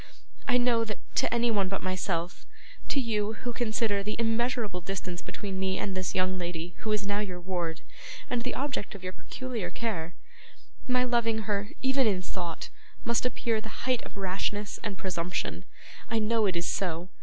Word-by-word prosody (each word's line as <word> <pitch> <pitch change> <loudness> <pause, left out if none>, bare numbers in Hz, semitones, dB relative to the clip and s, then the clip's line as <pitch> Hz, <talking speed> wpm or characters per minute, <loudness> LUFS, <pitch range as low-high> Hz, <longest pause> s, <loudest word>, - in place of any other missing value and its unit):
I 250 - +5
know 245 -2 +4
that 215 -2 -3 0.2
to - - +4
anyone 230 -5 +3
but 195 - -1
myself 180 -2 -1 0.4
to 280 - +2
you, 215 -4 +1
who 240 +2 -4
consider 220 -3 +2
the 210 +2 -1
immeasurable 230 -4 +1
distance 185 -1 -3
between 195 -2 -4
me 190 0 +1
and 195 -2 -1
this 185 -1 -1
young 185 0 +2
lady, 175 0 -3
who 215 - -1
is 210 -1 +2
now 200 +1 +1
your 185 -4 -2
ward, 175 -3 -2 0.5
and 245 - +1
the 250 - -1
object 270 -8 -1
of 190 - -9
your 185 0 -3
peculiar 250 -3 -4
care 175 -8 -2 0.7
my 250 0 +4
loving 230 -3 +2
her, 205 0 0
even 265 -1 +5
in 185 -3 +2
thought, 175 -3 -3 0.4
must 235 +1 +3
appear 230 -3 +1
the 220 +2 -7
height 255 -2 +3
of - - -10
rashness 200 +2 -1
and 200 -2 -3
presumption. 180 -1 -1 0.4
I 225 - +2
know 220 0 +4
it 185 - +1
is 170 0 +1
so. 175 -1 0
205 Hz, 180 wpm, -30 LUFS, 185-230 Hz, 0.7 s, I